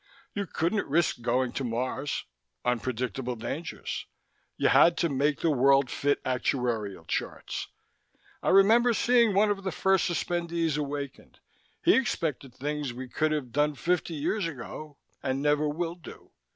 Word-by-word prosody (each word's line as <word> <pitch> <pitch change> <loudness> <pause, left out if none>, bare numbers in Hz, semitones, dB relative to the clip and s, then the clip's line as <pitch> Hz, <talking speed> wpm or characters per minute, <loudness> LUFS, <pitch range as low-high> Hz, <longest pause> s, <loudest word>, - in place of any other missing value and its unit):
You 200 -1 -3
couldn't 175 +7 -1
risk 160 -4 +1
going 125 +1 +1
to 140 - -3
Mars 130 +4 -2 0.4
unpredictable 125 +1 -1
dangers. 145 +9 -5 0.5
You - - +3
had 170 0 +6
to 170 - +1
make 145 +1 +1
the 165 - +3
world 135 -1 +4
fit 145 0 0
actuarial 120 -8 -1
charts. - - -3 0.7
I - - 0
remember 225 +5 +5
seeing 235 -4 +4
one 205 +1 +4
of 195 -1 -3
the 190 - -2
first 190 +2 +2
suspendees 170 -1 -1
awakened. 145 -2 -5 0.4
He 355 - +6
expected 150 - -1
things 145 0 -3
we 130 +1 -7
could 155 +4 0
have 145 -5 -2
done 150 +3 +1
fifty 170 +1 -1
years 170 +6 -1
ago 150 +1 -8 0.2
and 130 0 -1
never 150 +1 +2
will 165 +2 -2
do. 175 -1 -13
150 Hz, 145 wpm, -28 LUFS, 130-170 Hz, 0.7 s, had